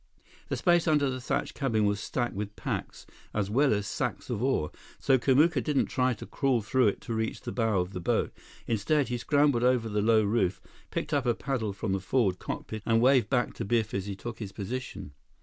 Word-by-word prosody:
The -, -, -1 dB
space 175 Hz, -2 st, +3 dB
under 145 Hz, -3 st, +3 dB
the 130 Hz, 0 st, -5 dB
thatched -, -, -2 dB
cabin 115 Hz, -7 st, +1 dB
was 100 Hz, 0 st, +1 dB
stacked 120 Hz, +2 st, -2 dB
with 105 Hz, +1 st, -5 dB
packs -, -, -5 dB, 0.3 s
as 105 Hz, -1 st, -1 dB
well 140 Hz, +5 st, +3 dB
as 105 Hz, -1 st, 0 dB
sacks -, -, -3 dB
of 105 Hz, -, -2 dB
ore, 130 Hz, -, +1 dB, 0.3 s
so 130 Hz, -1 st, +3 dB
Kamuka 140 Hz, +2 st, +3 dB
didn't 145 Hz, 0 st, +1 dB
try 130 Hz, -1 st, +1 dB
to -, -, -9 dB
crawl 130 Hz, -5 st, 0 dB
through 125 Hz, +3 st, +3 dB
it 100 Hz, -, -1 dB
to 115 Hz, -, -5 dB
reach 110 Hz, 0 st, -2 dB
the -, -, -5 dB
bow 115 Hz, -5 st, +1 dB
of 90 Hz, +2 st, -2 dB
the 90 Hz, -, -4 dB
boat. 85 Hz, -, 0 dB, 0.3 s
Instead, 125 Hz, +6 st, +1 dB
he 120 Hz, -1 st, -2 dB
scrambled 145 Hz, -2 st, +2 dB
over 125 Hz, -2 st, +3 dB
the 105 Hz, -1 st, 0 dB
low 110 Hz, 0 st, +4 dB
roof, 100 Hz, -3 st, +1 dB, 0.3 s
picked 150 Hz, -, -3 dB
up 140 Hz, -4 st, +1 dB
a 120 Hz, -, +3 dB
paddle 115 Hz, -5 st, -2 dB
from 100 Hz, +1 st, -3 dB
the 95 Hz, -, 0 dB
forward 95 Hz, -1 st, +1 dB
cockpit, 110 Hz, -1 st, -5 dB
and 115 Hz, +1 st, +3 dB
waved 130 Hz, +1 st, +4 dB
back 125 Hz, -2 st, +1 dB
to -, -, -5 dB
Biff 110 Hz, +1 st, 0 dB
as 100 Hz, 0 st, -2 dB
he 100 Hz, -, -4 dB
took 115 Hz, +3 st, -7 dB
his 105 Hz, -4 st, -5 dB
position. 100 Hz, -, -5 dB
115 Hz, 220 wpm, -28 LUFS, 105-130 Hz, 0.3 s, low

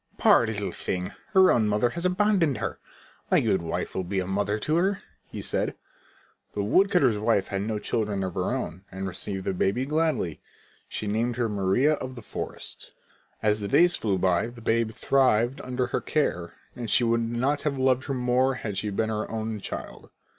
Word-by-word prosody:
"Poor 115 Hz, -, +5 dB
little 105 Hz, -2 st, -2 dB
thing! 90 Hz, -1 st, -3 dB, 0.2 s
Her 190 Hz, -1 st, +7 dB
own 110 Hz, -3 st, +3 dB
mother 105 Hz, +3 st, +2 dB
has 170 Hz, +1 st, -4 dB
abandoned 180 Hz, -, +2 dB
her. -, -, -4 dB, 0.5 s
My -, -, +5 dB
good 95 Hz, -, +1 dB
wife 85 Hz, +2 st, -3 dB
will 95 Hz, -, -2 dB
be 95 Hz, +2 st, -2 dB
a 95 Hz, -, -1 dB
mother 100 Hz, +2 st, 0 dB
to 150 Hz, +9 st, -1 dB
her," 195 Hz, +3 st, +1 dB, 0.3 s
he -, -, -7 dB
said. -, -, 0 dB, 0.8 s
The 100 Hz, -, -1 dB
woodcutter's 140 Hz, -, +3 dB
wife 105 Hz, -3 st, +1 dB
had 95 Hz, 0 st, -2 dB
no 110 Hz, +1 st, -2 dB
children 105 Hz, -2 st, -1 dB
of 95 Hz, -2 st, -3 dB
her -, -, -1 dB
own 90 Hz, +4 st, -4 dB
and 95 Hz, +1 st, -4 dB
received 95 Hz, +1 st, -4 dB
the -, -, 0 dB
baby 100 Hz, +8 st, 0 dB
gladly. 150 Hz, -, 0 dB, 0.5 s
She -, -, -4 dB
named 115 Hz, +4 st, 0 dB
her 120 Hz, -1 st, 0 dB
Maria 105 Hz, +8 st, +2 dB
of 130 Hz, -3 st, -5 dB
the 120 Hz, -, -9 dB
forest. -, -, -7 dB, 0.5 s
As 105 Hz, 0 st, +2 dB
the 100 Hz, -, -3 dB
days 175 Hz, -, +5 dB
flew 100 Hz, -4 st, 0 dB
by 90 Hz, 0 st, +2 dB
and 120 Hz, +1 st, -8 dB
the 120 Hz, -, -11 dB
babe 115 Hz, 0 st, +1 dB
thrived 120 Hz, +1 st, +2 dB
under 125 Hz, 0 st, -1 dB
her 120 Hz, -, -2 dB
care, 90 Hz, -, -1 dB, 0.3 s
she 120 Hz, -, +3 dB
could 115 Hz, 0 st, +2 dB
not 135 Hz, +5 st, 0 dB
have 145 Hz, -2 st, -1 dB
loved 130 Hz, 0 st, +2 dB
her 135 Hz, -, -2 dB
more 125 Hz, +1 st, +2 dB
had 105 Hz, -5 st, -3 dB
she 105 Hz, -, -2 dB
been 110 Hz, +2 st, -1 dB
her 110 Hz, -1 st, -2 dB
own 110 Hz, -1 st, -3 dB
child. -, -, -7 dB
110 Hz, 195 wpm, -26 LUFS, 100-130 Hz, 0.8 s, Her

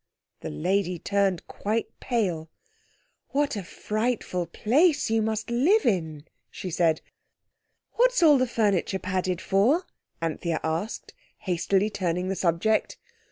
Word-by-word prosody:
The -, -, -6 dB
lady 180 Hz, -, 0 dB
turned 195 Hz, -1 st, 0 dB
quite 220 Hz, +2 st, -2 dB
pale. 180 Hz, -10 st, -1 dB, 0.8 s
"What 285 Hz, -2 st, 0 dB
a 205 Hz, -, -3 dB
frightful 210 Hz, -2 st, -2 dB
place 285 Hz, -, +2 dB
you 225 Hz, 0 st, +3 dB
must 220 Hz, +1 st, -2 dB
live 330 Hz, -, +3 dB
in!" 160 Hz, -7 st, -1 dB, 0.2 s
she 185 Hz, -, -6 dB
said. 165 Hz, -1 st, +2 dB, 0.9 s
"What's -, -, +3 dB
all 295 Hz, -4 st, +7 dB
the 255 Hz, -, +2 dB
furniture 205 Hz, -5 st, +1 dB
padded 185 Hz, -1 st, -2 dB
for?" 245 Hz, -, +2 dB, 0.3 s
Anthea 165 Hz, 0 st, -2 dB
asked, 160 Hz, +7 st, -3 dB, 0.3 s
hastily 190 Hz, +3 st, +1 dB
turning 180 Hz, -2 st, -1 dB
the 195 Hz, -, -1 dB
subject. 185 Hz, +5 st, +1 dB
200 Hz, 120 wpm, -26 LUFS, 175-230 Hz, 0.9 s, all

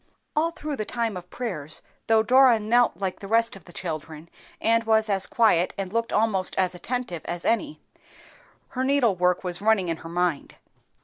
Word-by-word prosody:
All 315 Hz, +2 st, +2 dB
through 305 Hz, -4 st, -6 dB
the 215 Hz, -, -2 dB
time 230 Hz, -1 st, -2 dB
of 180 Hz, 0 st, -9 dB
prayers, 165 Hz, -, -4 dB, 0.2 s
though 225 Hz, -1 st, +4 dB
Dora 255 Hz, +1 st, +6 dB
knelt 235 Hz, -2 st, +2 dB
like 190 Hz, -1 st, -3 dB
the 200 Hz, -, -8 dB
rest 230 Hz, +1 st, +2 dB
of 195 Hz, -, -14 dB
the 175 Hz, -, -14 dB
children, 160 Hz, -2 st, -6 dB, 0.3 s
and 230 Hz, +1 st, +2 dB
was 220 Hz, -1 st, +2 dB
as 195 Hz, -1 st, +2 dB
quiet 185 Hz, -7 st, +2 dB
and 195 Hz, 0 st, -4 dB
looked 230 Hz, 0 st, -1 dB
almost 210 Hz, -4 st, +1 dB
as 185 Hz, -1 st, +1 dB
attentive 180 Hz, -3 st, -4 dB
as 175 Hz, 0 st, -5 dB
any, 295 Hz, +6 st, 0 dB, 0.9 s
her 260 Hz, 0 st, -3 dB
needlework 205 Hz, -11 st, +2 dB
was 180 Hz, 0 st, -4 dB
running 205 Hz, -4 st, +2 dB
in 165 Hz, -, -2 dB
her 165 Hz, -, -10 dB
mind. 175 Hz, -3 st, -1 dB
210 Hz, 180 wpm, -25 LUFS, 180-230 Hz, 0.9 s, Dora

